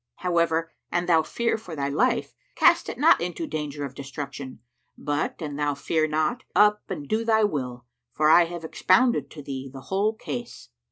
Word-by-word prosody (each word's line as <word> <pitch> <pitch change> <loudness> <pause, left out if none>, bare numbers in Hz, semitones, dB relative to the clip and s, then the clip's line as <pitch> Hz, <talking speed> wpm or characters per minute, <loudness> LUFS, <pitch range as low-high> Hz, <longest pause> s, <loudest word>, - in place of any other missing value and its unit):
However 170 -2 0 0.2
an 175 0 0
thou 165 -2 +4
fear 235 +7 -1
for 180 -7 -8
thy 140 -2 -1
life, 235 - +1 0.2
cast - - +4
it - - -6
not 320 +5 +5
into 180 - -3
danger 150 - -4
of 135 - -8
destruction; 140 -1 -7 0.4
but, 145 +1 -2
an 145 -2 -5
thou 145 -1 0
fear 155 +2 0
not, 155 0 0
up 210 +2 +5
and 150 -7 -5
do 220 +6 0
thy 220 -1 +3
will, 125 - -2 0.3
for 155 - +1
I 170 +2 +7
have 170 0 -7
expounded 235 +9 +2
to 150 - -10
thee 135 -1 -6
the 135 0 -9
whole 200 +7 0
case. 235 - -7
160 Hz, 180 wpm, -25 LUFS, 145-210 Hz, 0.4 s, I